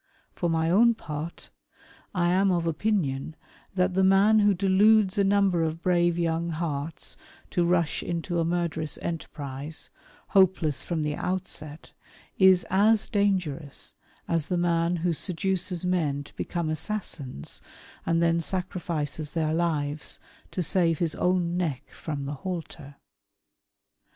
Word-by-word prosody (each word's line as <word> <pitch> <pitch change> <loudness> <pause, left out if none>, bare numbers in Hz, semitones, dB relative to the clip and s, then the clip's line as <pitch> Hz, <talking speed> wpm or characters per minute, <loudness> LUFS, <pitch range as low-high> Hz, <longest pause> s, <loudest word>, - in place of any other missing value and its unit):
For 175 - -2
my 160 0 +1
own 230 +5 +5
part, 155 -3 -7 0.6
I 175 -1 +2
am 195 +2 +3
of 170 -2 0
opinion 160 -5 -1 0.4
that 180 0 +2
the 190 +1 +2
man 195 +3 +5
Avho 205 -2 +3
deludes 200 +1 +4
a - - +5
number 195 -3 +3
of 165 +1 -2
brave 175 -1 +2
young 170 0 0
hearts 155 -2 -4 0.3
to 175 - +2
rush 170 -2 +1
into 170 0 -2
a - - +2
murderous 165 -2 -1
enterprise, 145 -3 -4 0.4
hopeless 180 -7 +3
from 165 -3 -2
the 150 0 -1
outset, 165 -5 -4 0.5
is 190 -2 +6
as 210 +3 +4
dangerous 180 -8 +1 0.3
as 165 -3 0
the 180 - 0
man 170 0 +1
who 175 - +2
seduces 180 +1 0
men 155 -6 0
to - - -16
become 170 -3 -2
assassins 155 - -4 0.4
and 165 0 +1
then 170 0 +2
sacrifices 160 -4 -3
their 155 -2 0
lives 155 -3 -1 0.3
to 180 - -2
save 165 -1 +2
his 165 -1 0
own 180 -1 0
neck 155 -8 -3
from 145 -3 -5
the 140 - -3
halter. 160 -6 -6
170 Hz, 135 wpm, -27 LUFS, 155-185 Hz, 0.6 s, is